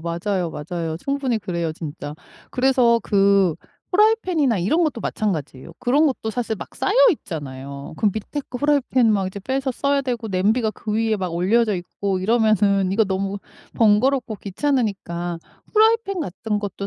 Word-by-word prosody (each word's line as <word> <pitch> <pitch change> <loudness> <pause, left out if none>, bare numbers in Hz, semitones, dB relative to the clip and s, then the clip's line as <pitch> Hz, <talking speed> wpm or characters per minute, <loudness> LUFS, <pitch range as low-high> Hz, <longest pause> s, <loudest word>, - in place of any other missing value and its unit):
맞아요, 170 +2 -2
맞아요. 160 +1 -4
충분히 270 0 -1
그래요 170 -5 -3
진짜. 150 -2 -7 0.4
그래서 250 -3 +3
그 195 -4 +3 0.4
프라이팬이나 365 - +3
이런 310 - +2
것도 295 -7 -2
마찬가지예요. 160 -10 -3
그런 285 +6 +3
것도 245 -5 -2
사실 230 -1 -2
막 - - -10
쌓여있잖아요. 145 - 0
그 215 - 0
밑에 220 +8 -4
거 250 - -5
프라이팬 275 -3 +2
이제 220 - +4
막 195 -2 0 0.2
빼서 265 0 -1
써야 280 +2 +1
되고 240 -4 -3
냄비가 215 +5 +1
그 215 0 -6
위에 220 0 +1
막 185 -3 -3
올려져 210 +5 +2
있고 190 +2 -3
이러면은 205 -2 +2
이거 220 +3 +3
너무 195 +1 -2 0.4
번거롭고 230 +2 +2
귀찮으니까 195 - -2 0.3
프라이팬 440 -3 +3
같은 210 - -3
것도 200 -1 -5
215 Hz, 360 characters per minute, -22 LUFS, 185-260 Hz, 0.4 s, 이제